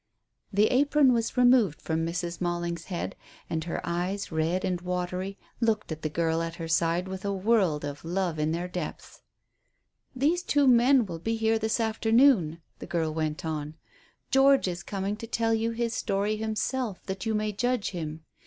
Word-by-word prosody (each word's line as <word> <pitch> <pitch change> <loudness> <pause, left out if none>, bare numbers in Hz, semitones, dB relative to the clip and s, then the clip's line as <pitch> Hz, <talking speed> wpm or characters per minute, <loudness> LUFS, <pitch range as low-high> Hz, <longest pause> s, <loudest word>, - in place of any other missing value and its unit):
The 205 +1 +4
apron 280 0 +4
was 230 +1 -1
removed 245 - +4
from 160 0 -1
Mrs. 170 +1 -3
Malling's 175 -1 -2
head, 180 -3 -4 0.4
and 160 0 -1
her 170 - -3
eyes, 180 +4 -2
red 165 +3 0
and 180 -1 -1
watery, 180 +2 -3 0.2
looked 225 -5 0
at 160 0 -5
the 155 - -2
girl 165 +1 0
at 165 0 -4
her 165 -1 -5
side 165 +2 +1
with 190 0 -6
a 200 - -1
world 190 -7 +1
of 145 0 -6
love 175 -1 -1
in 155 +1 +1
their 170 +2 -2
depths. 180 -3 -6 0.9
"These 305 +7 +2
two 290 -5 +2
men 250 0 +5
will 170 -4 -6
be 225 +7 -1
here 225 0 +1
this 220 +1 0
afternoon," 220 - +3 0.2
the - - -8
girl 165 -3 -1
went 155 0 -2
on. 155 -1 -4 0.6
"George 270 -3 +5
is 175 -1 -3
coming 195 +3 -3
to 230 - -7
tell 225 0 +1
you 225 +1 +1
his 230 0 -2
story 205 +1 0
himself, 220 0 -2
that 190 +2 -4
you 220 - +1
may 210 0 0
judge 245 +1 -1
him. 160 -3 -5
190 Hz, 180 wpm, -28 LUFS, 165-225 Hz, 0.9 s, men